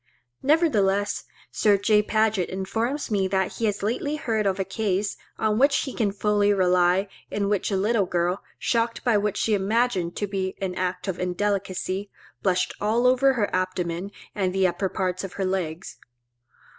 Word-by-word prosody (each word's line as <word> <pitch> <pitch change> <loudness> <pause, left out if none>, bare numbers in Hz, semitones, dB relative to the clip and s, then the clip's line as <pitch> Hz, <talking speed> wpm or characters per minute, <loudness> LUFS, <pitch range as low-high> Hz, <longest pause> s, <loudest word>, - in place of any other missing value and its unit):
Nevertheless 205 - +2 0.3
Sir 205 -2 +3
J. 210 +1 +3
Paget 215 -3 +1
informs 225 +9 -2
me 195 -2 +2
that 190 -1 -1
he 230 - 0
has 205 -2 -1
lately 250 +7 -1
heard 220 -8 0
of 195 0 0
a - - +2
case, 200 0 -1 0.2
on 215 0 +1
which 280 +1 +4
he 265 - -5
can 210 -4 0
fully 205 0 +2
rely, 180 0 +3 0.2
in 200 -1 -1
which 205 -2 0
a 195 - 0
little 205 0 +1
girl, 175 +2 0 0.2
shocked 230 -1 0
by 240 -3 +3
what 205 0 0
she 220 - +1
imagined 200 -3 +1
to 205 - -1
be 190 -1 -3
an 190 -2 -2
act 180 +1 -3
of 190 -2 -3
indelicacy, 190 +1 -2 0.3
blushed 185 -2 +1
all 225 +4 +2
over 255 +2 +5
her 215 -7 0
abdomen 185 0 -2 0.2
and 185 -3 -1
the 190 0 +3
upper 185 +2 0
parts 185 0 -2
of 195 - -6
her 195 - -2
legs. 180 -3 -3
200 Hz, 170 wpm, -25 LUFS, 185-220 Hz, 0.3 s, over